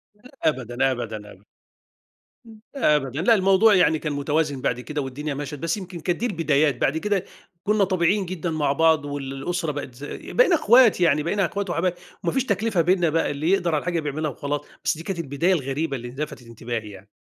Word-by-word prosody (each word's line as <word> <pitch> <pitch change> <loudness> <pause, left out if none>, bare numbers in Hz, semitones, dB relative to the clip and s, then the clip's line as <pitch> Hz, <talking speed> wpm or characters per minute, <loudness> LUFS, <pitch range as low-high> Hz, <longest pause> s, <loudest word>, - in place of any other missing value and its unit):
لأ، 250 +5 -17
أبدًا، 130 -3 +1
أبدًا، 110 -4 -5
أبدًا، 95 - -16 1.3
أ 150 - +3
أبدًا 135 +1 -2
لأ، 225 +4 +5
الموضوع 195 +2 +5
يعني 160 -3 +4
كان 150 -2 -3
متوازن 145 -1 -1
بعد 125 - 0
كده 145 +4 -4
والدنيا 140 +3 -4
مَشت، 145 +1 -5
بس 165 +4 -1
يمكن 185 -3 -8
كانت 175 +1 -1
دي 240 - -1
البدايات، 155 - +1
بعد 150 +4 +2
كده 200 +1 -1 0.4
كنّا 210 -1 +2
طبيعيين 185 +1 +1
جدًا 175 -1 -4
مع 150 -3 +1
بعض 160 0 +3
والأسرة 145 +4 -3
بقت 140 -3 -6
ز 140 - -12 0.2
بقينا - - +3
أخوات، 235 - +5
يعني 150 -3 +3
بقينا 195 +3 +1
أخوات 200 0 -3
وحبايب، 175 +1 0 0.3
وما 170 - +1
فيش 265 -1 +1
تكلفة 200 -3 +1
بينّا 175 -1 +2
بقى 165 0 +1
اللي 150 +4 -2
يقدر 175 -4 +2
على - - +2
الحاجة 175 -1 -1
بيعملها 150 0 -2
وخلاص. 145 +1 -3 0.2
بس 160 - +1
دي 165 - -8
كانت 180 -1 -4
البداية 160 +4 +1
الغريبة 140 -1 -2
اللي 120 -1 -6
لفتت 140 -3 -6
انتباهي 115 -1 -5
يعني. 100 0 -13
155 Hz, 195 wpm, -24 LUFS, 140-185 Hz, 1.3 s, لأ